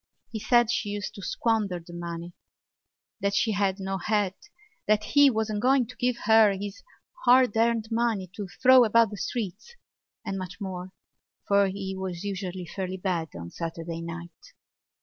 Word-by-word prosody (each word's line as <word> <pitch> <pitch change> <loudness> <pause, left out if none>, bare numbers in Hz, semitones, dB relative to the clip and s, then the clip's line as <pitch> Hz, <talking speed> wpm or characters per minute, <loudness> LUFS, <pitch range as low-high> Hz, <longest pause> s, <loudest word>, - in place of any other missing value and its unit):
He 220 - -4
said 240 +1 +3
she 210 - -1
used 205 +1 -4
to 205 - -10
squander 210 -3 0
the 175 +1 -13
money, 170 0 -6 0.9
that 200 0 0
she 225 - +2
had 200 -1 0
no 195 0 -3
head, 205 0 0 0.5
that 215 0 +3
he 285 +5 +5
wasn't 220 -3 -1
going 260 +1 +4
to - - -12
give 250 +1 0
her 220 -2 +6
his 200 +1 -6 0.4
hard 250 -3 +5
earned 225 -1 +2
money 225 -4 0
to 200 -1 -6
throw 255 +6 +6
about 230 -1 +4
the 205 - -6
streets, 225 - -5 0.5
and 195 -2 -3
much 180 -2 -7
more, 185 -2 -6 0.6
for 200 0 +4
he 190 0 -4
was 190 -2 -5
usually 190 -2 -4
fairly 190 +1 -4
bad 180 -4 -2
of 85 0 -6
a 85 - -10
Saturday 165 0 -5
night. 170 - -9
200 Hz, 170 wpm, -27 LUFS, 185-225 Hz, 0.9 s, her